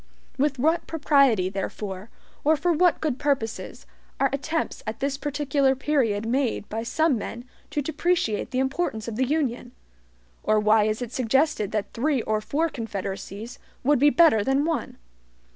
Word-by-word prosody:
With 280 0 +1
what 320 +6 +1
propriety, 275 - +3
therefore, 195 +1 -5 0.3
or 310 +2 +4
for 345 +4 +1
what 350 +2 +3
good 295 -5 -1
purposes, 275 -7 -2 0.3
are 270 -1 +2
attempts 315 +4 -2
at 215 +1 -4
this 275 0 -1
particular 280 -2 +1
period 255 -7 0
made 245 -3 0
by 220 +1 -3
some 280 +2 +1
men 240 +3 -6 0.2
to 300 -1 -2
depreciate 315 -7 0
the 255 - -3
importance 265 -4 -1
of 230 - -4
the 255 +2 +1
Union? 250 -5 -1 0.7
Or 215 0 +2
why 215 0 +4
is 215 +3 -1
it 240 - -7
suggested 255 -3 +1
that 210 -2 -2
three 265 0 0
or 215 0 0
four 310 +9 0
confederacies 205 - -6 0.2
would 290 0 +3
be 290 +2 +6
better 290 -10 +5
than 270 +4 +1
one? 325 -2 -2
265 Hz, 160 wpm, -25 LUFS, 220-295 Hz, 0.7 s, be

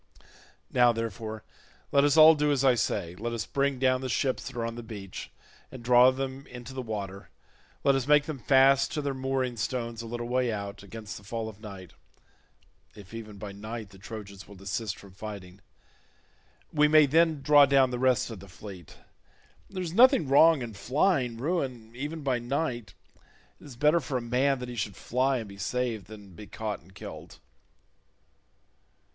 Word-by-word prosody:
Now, 120 -1 +5
therefore, 110 -1 -5 0.5
let 140 - +4
us 145 +2 +3
all 155 +1 +10
do 150 -1 +1
as 140 -1 +1
I 130 - +6
say; 95 -6 -1
let 120 +3 -4
us 110 -3 -3
bring 140 -1 0
down 130 0 +2
the 130 - -4
ships 130 +2 -1
that - - -8
are 115 - -1
on 115 - -3
the 120 - -7
beach 105 -5 -8 0.4
and 130 -2 -10
draw 125 +1 +7
them 135 +1 -4
into 125 +1 -9
the 130 - -4
water; 100 -4 -6 0.5
let 140 - +5
us 135 -1 -1
make 150 0 +5
them 155 -4 -5
fast 135 +1 +4
to 150 - -1
their 140 -1 -1
mooring 130 -2 -2
stones 115 0 -3
a 115 - -8
little 120 +1 -4
way 125 -1 +1
out, 100 -2 -5
against 105 +1 -8
the 105 - -13
fall 110 +2 -4
of 110 -2 -10
night—if 95 - -16
even 110 -2 -8
by 100 0 -7
night 110 +2 -7
the 95 - -15
Trojans 100 -1 -9
will 100 - -13
desist 100 +2 -4
from 100 - -14
fighting; 100 -2 -9 1.1
we 150 0 +4
may 155 0 +6
then 160 0 +2
draw 145 -1 +7
down 135 -1 +4
the 125 - -3
rest 130 -3 +2
of 110 - -8
the 100 - -12
fleet. 90 -3 -11 0.7
There 185 -2 -4
is 170 -2 -5
nothing 255 - +6
wrong 145 +1 +5
in 115 -2 -7
flying 125 - +1
ruin 130 -6 -3
even 150 +4 -5
by 130 -3 0
night. 120 - -3 0.6
It - - -16
is 140 -4 -11
better 150 +6 +3
for 130 -3 -3
a - - -3
man 130 +4 +1
that 125 0 -7
he 120 - -6
should 105 -3 -3
fly 130 +2 0
and 115 -3 -5
be 100 0 -12
saved 115 -2 -2
than 105 -3 -12
be 105 +5 -11
caught 110 -2 -4
and 95 +4 -21
killed." - - -10
120 Hz, 185 wpm, -28 LUFS, 105-135 Hz, 1.1 s, all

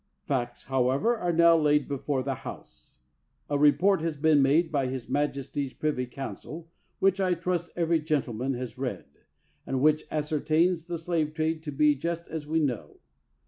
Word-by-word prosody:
Facts, 120 -4 -2
however, 135 - +1
are 175 -6 -1
now 170 0 +6
laid 150 -2 +3
before 140 -1 -2
the 135 0 -1
House. 60 +1 -11 0.5
A 145 - +2
report 155 +6 +4
has 165 -2 -2
been 150 -1 +4
made 155 +5 +3
by 140 -3 +1
his 130 -2 -5
maj 145 -1 0
esty's 135 0 -4
privy 145 -5 -2
council, 155 +5 -8 0.3
which, 195 0 +2
I 185 -2 +2
trust, 175 0 -2
every 170 -1 +2
gentleman 135 -5 -1
has 125 0 -6
read, 130 -2 -3 0.6
and 135 - -2
which 155 +2 +3
ascertains 155 +3 +1
the 175 -1 -3
slave 160 -2 -1
trade 160 0 -1
to 155 -2 -5
be 150 +1 +4
just 170 +4 -4
as 155 -2 -6
we 160 +1 +1
know. 125 - -2
150 Hz, 170 wpm, -27 LUFS, 135-165 Hz, 0.6 s, now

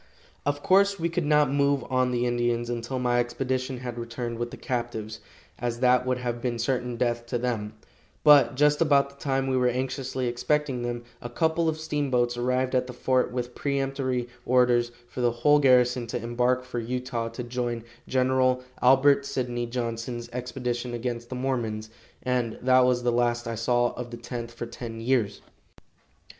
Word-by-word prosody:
Of 145 0 -1
course, 200 +1 +4
we 170 +1 0
could 170 -2 -1
not 150 -2 +4
move 140 -2 +2
on 130 -1 +1
the 125 0 0
Indians 120 0 0
until 120 +2 -3
my 125 -1 +1
expedition 130 +1 -2
had 120 -2 -5
returned 115 0 -5
with 120 0 -2
the - - -9
captives, 110 -3 -4 0.4
as 120 -1 -2
that 125 0 +4
would 130 0 +1
have 120 -1 -3
been 120 -1 -1
certain 125 +1 -1
death 120 -1 -1
to 120 - -1
them; 115 -3 -2 0.5
but 145 -2 +7
just 150 +2 +3
about 140 -3 +4
the - - -20
time 135 -1 0
we 135 -1 0
were 125 -1 +3
anxiously 130 +1 -2
expecting 125 +2 0
them, 120 0 -3 0.2
a 120 - -6
couple 160 +5 +1
of 155 0 -3
steamboats 135 -6 0
arrived 125 +2 0
at 125 0 +1
the 125 - -7
fort 130 +1 +1
with 125 0 -4
peremptory 135 -3 -1 0.2
orders 120 -1 +3 0.2
for 125 - -6
the 120 - +4
whole 135 +6 +3
garrison 125 -3 +4
to 120 - -3
embark 125 +2 0
for 125 -1 -4
Utah 120 0 -3
to 125 - -6
join 120 -1 -3 0.2
Gen. 130 0 +2 0.2
Albert 135 +2 +5
Sydney 120 -3 -2
Johnson's 120 0 -4
expedition 125 0 -3
against 120 0 -4
the 130 - -5
Mormons, 115 -4 -2 0.3
and 125 -3 -1
that 130 0 +5
was 125 -1 +2
the 120 - +2
last 120 0 +1
I 115 - -2
saw 120 +2 +1
of 125 -1 -7
the 120 - -7
Tenth 120 0 -6
for 120 0 -6
ten 115 -1 -7
years. 115 -3 0
125 Hz, 175 wpm, -26 LUFS, 120-130 Hz, 0.5 s, but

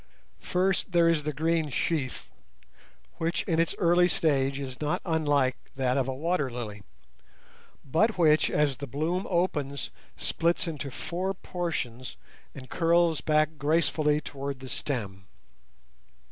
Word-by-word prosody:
First 185 +1 0
there 170 -1 +5
is 160 -3 +2
the 155 - 0
green 160 +1 0
sheath, 140 -1 -2 0.9
which 165 +2 0
in 165 -3 0
its 165 - +1
early 175 +1 +4
stage 140 -5 +1
is 135 -1 -6
not 150 0 0
unlike 145 -6 +2 0.2
that 130 -1 +1
of 135 -2 +1
a 130 - -2
water 155 -1 0
lily, 110 -4 -6 1.0
but 205 - +2
which 155 -3 +4
as 145 -3 +1
the 140 - -6
bloom 160 +8 -1
opens 150 -7 -1 0.3
splits 170 +1 0
into 145 -4 -4
four 185 +8 -3
portions 130 - -4 0.4
and 130 -2 -9
curls 170 -1 +2
back 155 0 +1
gracefully 150 0 +2
towards 140 -2 -5
the 130 0 -10
stem. 100 -11 -4
150 Hz, 130 wpm, -28 LUFS, 135-170 Hz, 1.0 s, there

